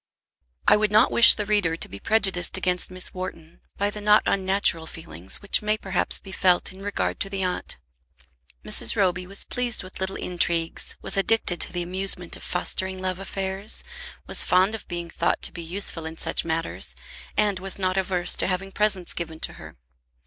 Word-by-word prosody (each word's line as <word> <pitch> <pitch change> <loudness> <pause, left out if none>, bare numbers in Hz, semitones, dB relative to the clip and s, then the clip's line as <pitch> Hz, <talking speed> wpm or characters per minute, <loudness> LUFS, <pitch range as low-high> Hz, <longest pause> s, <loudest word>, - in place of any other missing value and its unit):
I - - +6
would 210 -1 0
not 215 +1 +4
wish 235 - +9
the 210 - -3
reader 200 -6 +1
to - - -5
be 100 - -10
prejudiced 195 - +1
against 180 0 0
Miss 185 0 -3
Wharton 170 -3 -8 0.2
by 205 +1 0
the 210 - -7
not 210 +1 +4
unnatural 190 -4 +2
feeling 90 - -11
which 200 - +3
may 215 0 0
perhaps 190 -3 0
be 195 - -12
felt 185 0 +2
in 190 - -13
regard 205 0 -3
to 195 - -2
the 195 -1 -3
aunt. 180 -1 -2 0.9
Mrs. 115 - +4
Roby 185 -2 0
was 195 +1 0
pleased 245 -4 -2
with 185 - -11
little 190 0 -3
intrigues, 170 -2 -1
was - - +1
addicted 195 -3 +2
to - - -4
the 175 -1 -3
amusement 180 -1 0
of - - -12
fostering 190 +1 -1
love 185 0 -3
affairs, 195 +1 0 0.4
was - - +2
fond 185 +4 +2
of 225 - -7
being 175 -1 -5
thought - - -1
to - - +2
be 170 - -7
useful 165 -1 +1
in 160 0 -8
such - - 0
matters, 165 0 -2 0.4
and 205 -3 +2
was 195 +1 -1
not 185 -1 -1
averse 185 -2 0
to - - +1
having 195 +1 -3
presents 205 -3 +1
given 160 -2 -6
to - - -3
her. - - -13
185 Hz, 190 wpm, -24 LUFS, 175-200 Hz, 0.9 s, wish